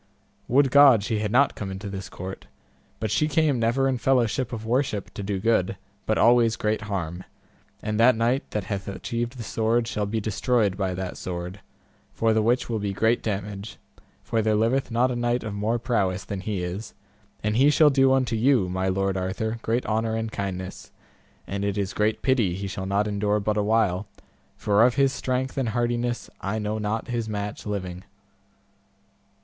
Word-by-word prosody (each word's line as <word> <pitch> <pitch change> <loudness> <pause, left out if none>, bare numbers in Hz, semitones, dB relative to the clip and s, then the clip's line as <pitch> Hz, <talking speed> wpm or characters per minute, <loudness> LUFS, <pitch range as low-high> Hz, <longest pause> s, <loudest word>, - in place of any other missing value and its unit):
Would 135 +1 +3
God 135 -7 +7
she 110 0 -1
had 105 -1 -2
not 135 +4 +4
come 100 - -5
into 95 +2 -6
this 95 -1 -6
court, 95 +1 -8 0.5
but 110 -2 -2
she 150 +8 +2
came 155 -4 +2
never 120 +4 +2
in 130 -2 0
fellowship 125 -1 +1
of 110 -2 -5
worship 120 -4 -1
to 105 - -6
do 100 -1 -2
good, 100 -3 +1 0.3
but 110 - +2
always 115 -1 +5
great 110 0 -1
harm; 90 -2 -3 0.6
and 110 0 -2
that 120 +1 +6
knight 120 +4 0
that 105 - -2
hath 95 0 -4
achieved 120 +5 -4
the 120 - -5
sword 115 +2 0
shall 105 -2 -2
be 110 +2 -1
destroyed 110 -1 +1
by 95 -2 -2
that 95 0 -5
sword, 90 +2 -5 0.6
for 115 -1 +2
the 110 - +3
which 120 +4 +1
will 115 -2 -2
be 100 -1 -2
great 110 +4 +2
damage, 100 0 -4 0.5
for 115 - 0
there 110 0 +2
liveth 115 +5 +1
not 125 +2 +2
a - - -2
knight 120 +1 0
of 110 -2 -4
more 105 +3 0
prowess 100 -6 -1
than 100 - -4
he 95 -2 -3
is, 90 +5 -5 0.5
and 105 0 0
he 140 +3 +6
shall 150 0 +5
do 135 -1 +4
unto 130 -3 +2
you, 120 -3 +3
my 95 +1 -1
Lord 95 +1 0
Arthur, 95 +5 -2
great 115 +3 -1
honour 110 +1 0
and 110 0 -3
kindness; 95 -2 -5 0.6
and 100 0 -4
it 100 0 -1
is 100 -1 -2
great 105 +1 0
pity 120 -10 +2
he 100 +1 -5
shall 95 -1 -4
not 100 +2 +1
endure 105 0 0
but 105 +1 -1
a 105 - +2
while, 105 -3 +1 0.5
for 105 +1 +3
of 125 0 +4
his 135 -1 +3
strength 130 +1 -2
and 125 -4 0
hardiness 120 +1 -1
I 100 +2 -2
know 105 0 -2
not 110 +2 -2
his 115 -2 -2
match 105 0 -4
living. 95 -3 -4
110 Hz, 190 wpm, -25 LUFS, 100-120 Hz, 0.6 s, God